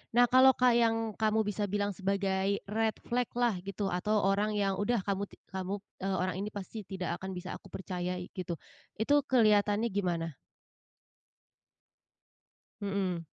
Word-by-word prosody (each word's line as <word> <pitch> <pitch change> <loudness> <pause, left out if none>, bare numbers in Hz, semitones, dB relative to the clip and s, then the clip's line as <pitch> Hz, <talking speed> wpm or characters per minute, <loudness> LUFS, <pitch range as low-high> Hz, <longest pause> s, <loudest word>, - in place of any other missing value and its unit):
Nah, 245 0 +7
kalau 260 +1 +8
ka 250 0 +6
yang 230 -1 +4 0.2
kamu 220 0 +2
bisa 210 +1 -2
bilang 205 +1 0
sebagai 195 0 0
red 220 +1 +1
flag-lah 245 -2 +1
gitu, 200 0 -2
atau 180 +5 0
orang 205 +2 +2
yang, 200 -1 +1
udah, 230 +2 +1
kamu 200 0 0
ti - - -13 0.2
kamu 190 0 -3 0.3
eee, 195 0 0
"Orang 185 -1 -1
ini 200 - -2
pasti 205 +2 -6
tidak 180 -3 -3
akan 190 0 -5
bisa 180 +1 -6
aku - - -16
percayai," 180 -1 -4
gitu. 185 -2 -3 0.5
Itu 290 +6 +4
kelihatannya 215 -2 +4
gimana? 170 -5 -1 2.5
Mhm. 190 -4 -1
200 Hz, 145 wpm, -31 LUFS, 190-220 Hz, 2.5 s, kalau